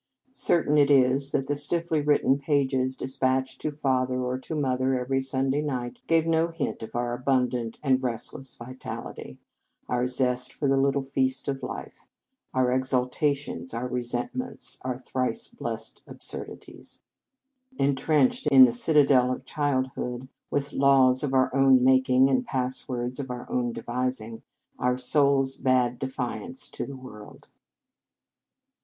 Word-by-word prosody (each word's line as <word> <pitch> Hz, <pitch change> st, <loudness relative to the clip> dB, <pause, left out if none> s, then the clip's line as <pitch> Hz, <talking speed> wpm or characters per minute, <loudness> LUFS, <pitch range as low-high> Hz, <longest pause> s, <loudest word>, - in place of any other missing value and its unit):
Certain 160 Hz, -, +2 dB
it 145 Hz, -, +4 dB
is 135 Hz, 0 st, +4 dB
that 135 Hz, -, -1 dB
the 145 Hz, -, -1 dB
stiffly 160 Hz, +2 st, 0 dB
written 145 Hz, -2 st, +2 dB
pages 135 Hz, -2 st, 0 dB
despatched 130 Hz, 0 st, -1 dB
to 155 Hz, -, -2 dB
father 130 Hz, -3 st, 0 dB
or 125 Hz, +1 st, -2 dB
to 155 Hz, -, -6 dB
mo 135 Hz, -4 st, 0 dB
ther 130 Hz, 0 st, 0 dB
every 135 Hz, +2 st, -1 dB
Sunday 135 Hz, +1 st, 0 dB
night 125 Hz, -5 st, -4 dB
gave 165 Hz, -1 st, +3 dB
no 165 Hz, 0 st, +2 dB
hint 165 Hz, -3 st, -4 dB
of 110 Hz, -, -8 dB
our 120 Hz, 0 st, -1 dB
abundant 125 Hz, -2 st, -1 dB
and 130 Hz, -2 st, +2 dB
restless 125 Hz, +1 st, -2 dB
vital 130 Hz, +2 st, -7 dB
ity, 65 Hz, -, -10 dB, 0.5 s
our 125 Hz, 0 st, 0 dB
zest 125 Hz, -1 st, +1 dB
for 145 Hz, -, -2 dB
the 135 Hz, -, +3 dB
little 140 Hz, 0 st, +1 dB
feast 135 Hz, 0 st, 0 dB
of 135 Hz, -1 st, -2 dB
life, -, -, -8 dB, 0.4 s
our 130 Hz, -1 st, +1 dB
exaltations, 130 Hz, +1 st, -1 dB
our 120 Hz, +2 st, -3 dB
resentments, 125 Hz, -, -3 dB
our 130 Hz, -2 st, -3 dB
thrice 130 Hz, -, -2 dB
blessed -, -, -5 dB
absurdities. -, -, -5 dB, 0.7 s
En 140 Hz, +1 st, +2 dB
trenched 145 Hz, 0 st, +1 dB
in 135 Hz, -3 st, +8 dB
the 120 Hz, -2 st, +5 dB
citadel 135 Hz, -2 st, +4 dB
of 130 Hz, -, -5 dB
childhood, 130 Hz, -3 st, -2 dB, 0.2 s
with 145 Hz, 0 st, -2 dB
laws 135 Hz, -2 st, +4 dB
of 145 Hz, -, -2 dB
our 130 Hz, 0 st, +2 dB
own 135 Hz, -2 st, +5 dB
making, 130 Hz, 0 st, +4 dB
and 130 Hz, -2 st, 0 dB
passwords 125 Hz, -1 st, -2 dB
of 135 Hz, -2 st, -5 dB
our 125 Hz, 0 st, -6 dB
own 120 Hz, -1 st, 0 dB
devising, 120 Hz, -2 st, -3 dB, 0.4 s
our 125 Hz, 0 st, +1 dB
souls 135 Hz, 0 st, +3 dB
bade 125 Hz, -2 st, +1 dB
defiance 135 Hz, -, -4 dB
to -, -, -5 dB
the 140 Hz, -1 st, -8 dB
world. 105 Hz, -5 st, -13 dB
130 Hz, 145 wpm, -26 LUFS, 125-140 Hz, 0.7 s, in